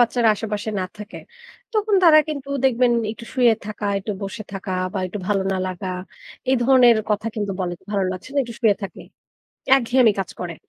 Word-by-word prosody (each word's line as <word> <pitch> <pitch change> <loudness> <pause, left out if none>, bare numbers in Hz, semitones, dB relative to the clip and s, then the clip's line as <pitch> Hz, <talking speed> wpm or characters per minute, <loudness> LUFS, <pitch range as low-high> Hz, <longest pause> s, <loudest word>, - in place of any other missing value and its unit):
বাচ্চারা 235 -1 +3
আশেপাশে 210 0 -4
না - - -1
থাকে, 210 +3 -9 0.6
তখন 425 -1 +1
তারা 310 -2 +8
কিন্তু 280 -2 -5 0.2
দেখবেন 245 -1 +3 0.2
একটু 230 +1 -11
শুয়ে 240 -3 +4
থাকা, 210 -1 -5
একটু 205 +2 -4
বসে 200 +3 -5
থাকা 195 0 -5 0.2
বা - - -1
একটু 205 +3 -6
ভালো 195 -2 +1
না - - -1
লাগা, 185 +1 -5 0.6
এই 265 - +4
ধরনের 250 -3 +6
কথা 210 +2 0
কিন্তু 205 -2 -2
বলে। 175 -1 -2 0.2
"ভালো 200 -2 0
লাগছে 185 +6 -8
না, - - +1
একটু 235 -2 -8
শুয়ে 215 -4 +4
থাকি।" 190 - -7 0.8
একঘেয়েমি 245 -2 +3
কাজ 190 - -3
করে। 175 -2 -5
220 Hz, 185 wpm, -22 LUFS, 195-245 Hz, 0.8 s, তারা